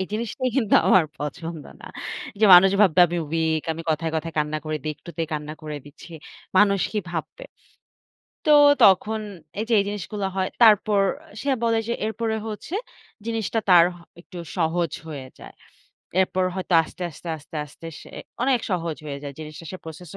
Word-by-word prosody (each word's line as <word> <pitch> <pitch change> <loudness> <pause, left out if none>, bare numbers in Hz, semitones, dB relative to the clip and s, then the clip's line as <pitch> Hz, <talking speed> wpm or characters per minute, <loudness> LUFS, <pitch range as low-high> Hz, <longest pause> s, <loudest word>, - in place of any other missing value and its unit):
এই 190 - -2
জিনিসটা 235 +4 -3
কিন্তু 225 -6 +2
আমার 185 -2 +6
পছন্দ 160 +1 -6 0.2
না। - - -11 0.5
যে - - +5
মানুষ 190 +2 +8
ভাববে 185 -3 +5
আমি 175 +1 -4
ওইক, 160 -1 0
আমি 165 +1 -7
কথায়, 160 +1 -1
কথায় 165 +1 -4
কান্না 150 +1 0
করি 155 0 -2
দি, 155 - -4
একটু 170 - -11
তে - - +1
কান্না 150 0 -4
করে 150 -1 -5
দিচ্ছি। 145 +4 -13 0.5
মানুষ 200 -2 +4
কি 215 - 0
ভাববে? 175 - -6 1.0
তো 305 - +4 0.3
তখন 210 +3 +4 0.4
এই - - 0
যে, 235 - +2
এই - - +2
জিনিসগুলো 205 0 -4
হয়, 190 -1 0 0.2
তারপর 210 -2 +5 0.4
সে 280 - -2
বলে 230 -1 +2
যে, 235 - 0
"এরপরে 220 +1 -2
হচ্ছে, 220 - -6 0.5
জিনিসটা 225 -1 -1
তার 175 -2 +8 0.4
একটু 180 0 -12 0.2
সহজ 165 -1 0 0.2
হয়ে 140 -4 -7
যায়।" - - -12 0.7
এরপর 185 0 +1
হয়তো 185 -1 -4
আস্তে, 170 - -10
আস্তে, 165 +3 -11
আস্তে, 155 +3 -16
আস্তে 150 +3 -12
সে - - -13 0.3
অনেক 255 -1 +2
সহজ 170 -3 -2
হয়ে 140 -1 -5
যায়। 140 -1 -6
জিনিসটা 155 +1 -9
সে 185 - -6
প্রসেস 160 +1 -10
180 Hz, 175 wpm, -24 LUFS, 160-210 Hz, 1.0 s, মানুষ